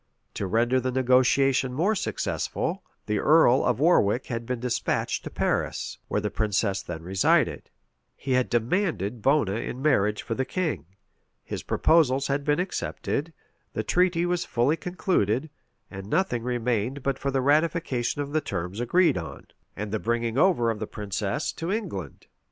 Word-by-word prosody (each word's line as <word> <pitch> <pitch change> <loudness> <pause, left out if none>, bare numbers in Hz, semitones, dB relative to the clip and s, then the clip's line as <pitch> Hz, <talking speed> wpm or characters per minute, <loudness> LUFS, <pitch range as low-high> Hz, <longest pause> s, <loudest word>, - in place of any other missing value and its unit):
To 100 - -3
render 120 +6 +2
the 130 0 -2
negotiation 130 +1 +3
more 175 +11 +2
successful, 210 - -2 0.2
the 105 -1 0
earl 150 -4 +5
of 125 -1 +1
Warwick 130 - +3
had 115 -2 -5
been 125 -1 -2
despatched 125 0 -1
to - - -4
Paris, - - -2
where - - 0
the 105 0 -3
princess 100 -2 0
then 80 -2 -7
resided; 95 +2 +1 0.5
he 135 - -5
had 125 -1 +2
demanded 120 - 0
Bona 130 -6 +2
in 120 - -5
marriage 105 -8 +2
for 115 - -3
the 130 - -1
king; 160 - -3 0.6
his - - -5
proposals 140 -5 +3
had 140 +1 -1
been 145 +2 +1
accepted; 165 -3 -3 0.4
the - - -2
treaty 180 -1 +2
was 175 0 0
fully 125 +6 +1
concluded; 160 - -1 0.4
and 95 -1 -8
nothing 185 -9 +1
remained 125 +2 -1
but 135 -1 -1
the 135 -1 0
ratification 145 -2 +1
of 140 - -8
the 155 - +2
terms 90 - -4
agreed 165 - +3
on, 80 - -8 0.3
and 105 0 -5
the 110 - -1
bringing 115 +1 -1
over 135 -8 +3
the 105 -1 -5
princess 105 +6 -3
to 165 +3 -4
England. 165 - -4
125 Hz, 155 wpm, -26 LUFS, 110-155 Hz, 0.6 s, earl